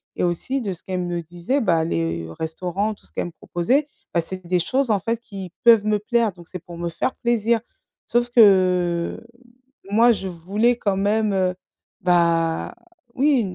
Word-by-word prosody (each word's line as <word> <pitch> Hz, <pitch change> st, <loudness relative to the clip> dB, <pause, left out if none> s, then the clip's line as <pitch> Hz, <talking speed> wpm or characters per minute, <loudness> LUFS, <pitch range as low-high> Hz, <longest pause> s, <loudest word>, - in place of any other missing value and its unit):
et -, -, -1 dB
aussi 215 Hz, +10 st, -1 dB
de 205 Hz, -, -3 dB
ce 175 Hz, -, -9 dB
qu'elles 185 Hz, -1 st, -3 dB
me 175 Hz, -1 st, -2 dB
disaient, 175 Hz, -, -2 dB
bah, 170 Hz, -10 st, +2 dB
les 85 Hz, -, -2 dB
restaurants, 180 Hz, +6 st, -2 dB
tout -, -, -20 dB
ce -, -, -23 dB
qu'elles -, -, -3 dB
me 175 Hz, -, -7 dB
proposaient, 250 Hz, -, 0 dB, 0.3 s
bah, 170 Hz, -, +2 dB
c'est 185 Hz, +2 st, -8 dB
des 180 Hz, 0 st, +2 dB
choses, 265 Hz, +5 st, 0 dB
en 210 Hz, -3 st, +3 dB
fait, 230 Hz, +4 st, -1 dB
qui 195 Hz, -6 st, -9 dB
peuvent 225 Hz, -3 st, +7 dB
me 215 Hz, 0 st, +2 dB
plaire 230 Hz, 0 st, +1 dB
donc 175 Hz, -1 st, -15 dB
c'est 180 Hz, -2 st, -7 dB
pour 175 Hz, -2 st, -10 dB
me 170 Hz, 0 st, -3 dB
faire 255 Hz, +9 st, -2 dB
plaisir. 235 Hz, -1 st, +2 dB, 0.5 s
Sauf 240 Hz, +1 st, +1 dB
que 185 Hz, -6 st, +4 dB, 0.7 s
moi, 230 Hz, +4 st, +5 dB
je 195 Hz, -3 st, -5 dB
voulais 205 Hz, +8 st, 0 dB
quand 200 Hz, -4 st, 0 dB
même, 210 Hz, +1 st, +1 dB
heu, 185 Hz, -1 st, +1 dB, 0.5 s
bah, 170 Hz, -2 st, +2 dB, 0.4 s
oui, 275 Hz, -2 st, +3 dB
190 Hz, 180 wpm, -22 LUFS, 175-230 Hz, 0.7 s, peuvent